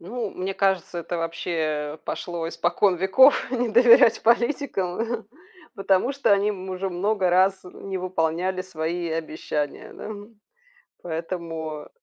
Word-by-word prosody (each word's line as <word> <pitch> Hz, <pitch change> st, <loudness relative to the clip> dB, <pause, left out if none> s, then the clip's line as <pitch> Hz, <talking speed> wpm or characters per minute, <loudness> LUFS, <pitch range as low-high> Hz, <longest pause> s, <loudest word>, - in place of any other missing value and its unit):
Ну, 220 Hz, +4 st, -5 dB
мне 190 Hz, +1 st, -4 dB
кажется, 190 Hz, -3 st, 0 dB
это 170 Hz, +1 st, -4 dB
вообще 160 Hz, -3 st, -3 dB
пошло 170 Hz, -2 st, -4 dB
испокон 175 Hz, +3 st, +1 dB
веков- 195 Hz, -, +4 dB
не 245 Hz, -2 st, 0 dB
доверять 235 Hz, 0 st, +6 dB
политикам, 235 Hz, -6 st, +1 dB
э, 225 Hz, -, +1 dB
хм. 225 Hz, -, -15 dB, 0.5 s
Потому 195 Hz, +5 st, +1 dB
что 275 Hz, -6 st, +2 dB
они 200 Hz, +1 st, +3 dB
м 190 Hz, -2 st, -6 dB
уже 190 Hz, +1 st, -3 dB
много 190 Hz, +1 st, 0 dB
раз, 190 Hz, +2 st, +3 dB
э, -, -, -10 dB
не 195 Hz, -1 st, -6 dB
выполняли 180 Hz, +1 st, -1 dB
свои 170 Hz, -1 st, -3 dB
обещания, 155 Hz, -2 st, -4 dB
да. -, -, -8 dB, 0.9 s
Поэтому 165 Hz, -2 st, -5 dB
185 Hz, 135 wpm, -24 LUFS, 165-200 Hz, 0.9 s, доверять